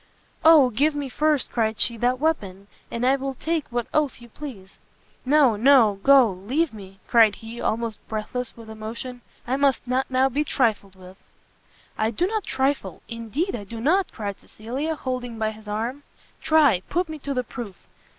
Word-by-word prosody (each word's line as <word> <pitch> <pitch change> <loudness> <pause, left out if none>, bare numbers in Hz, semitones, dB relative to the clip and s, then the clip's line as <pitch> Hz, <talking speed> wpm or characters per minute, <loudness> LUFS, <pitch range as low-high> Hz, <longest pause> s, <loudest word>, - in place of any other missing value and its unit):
"Oh 310 -6 +7
give 290 +7 +1
me 285 -2 -3
first," 300 +1 +1
cried 220 -2 0
she, 235 - +5
"that 245 +2 +1
weapon, 200 -12 -1 0.2
and 235 +1 -2
I 265 +2 +4
will 270 0 -4
take 320 +2 -2
what 240 -1 -2
oath 300 -5 +1
you 240 0 -14
please!" 220 -8 -10 0.5
"No, 275 -4 +4
no! 225 -3 +5
go, 270 -2 +6
leave 245 - -1
me, 195 -2 -12
" - - -33
cried 225 -4 +5
he, 225 +3 -9
almost 225 -1 -2
breathless 225 +3 -4
with 230 -1 -12
emotion, 225 +3 -7 0.2
"I 255 +2 0
must 275 -2 +1
not 255 +2 0
now 260 0 +3
be 280 +3 0
trifled 215 -9 0
with." 185 0 -14 0.8
"I 220 - +2
do 235 +10 0
not 430 +1 -2
trifle! 270 +2 -1
indeed 230 - -3
I 210 - -6
do 225 +3 -8
not!" 355 +10 +2
cried 205 -3 -5
Cecilia, 265 +9 -4
holding 250 -4 -4
by 220 0 -1
his 215 0 -14
arm: 230 +7 -3 0.4
"try, 290 - +4
put 355 +1 0
me 315 -1 -7
to 280 0 -4
the 250 - 0
proof!" 225 -5 -8
245 Hz, 180 wpm, -24 LUFS, 220-280 Hz, 0.8 s, Oh